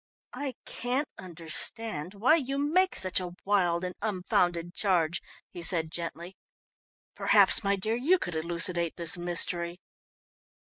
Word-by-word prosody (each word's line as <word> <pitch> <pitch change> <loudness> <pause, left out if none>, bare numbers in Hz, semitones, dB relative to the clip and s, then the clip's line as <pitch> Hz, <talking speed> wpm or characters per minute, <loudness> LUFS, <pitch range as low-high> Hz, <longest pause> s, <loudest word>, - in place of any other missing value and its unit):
"I 280 -3 -4
can't 255 +5 -2
understand 175 +1 -1
why 235 +10 +4
you 275 -2 -3
make 335 +7 +2
such 185 0 +1
a 180 -1 -6
wild 180 -4 +1
and 180 0 -3
unfounded 180 -4 0
charge," 175 -5 +1 0.3
he 175 - -8
said 165 -2 +2
gently. 170 +2 -6 0.8
"Perhaps, - - +4
my 200 0 +2
dear, 215 +3 -2
you 300 +10 +3
could 175 - -4
elucidate 170 +1 -1
this 170 -2 0
mystery." 175 0 0
180 Hz, 130 wpm, -28 LUFS, 170-220 Hz, 0.8 s, why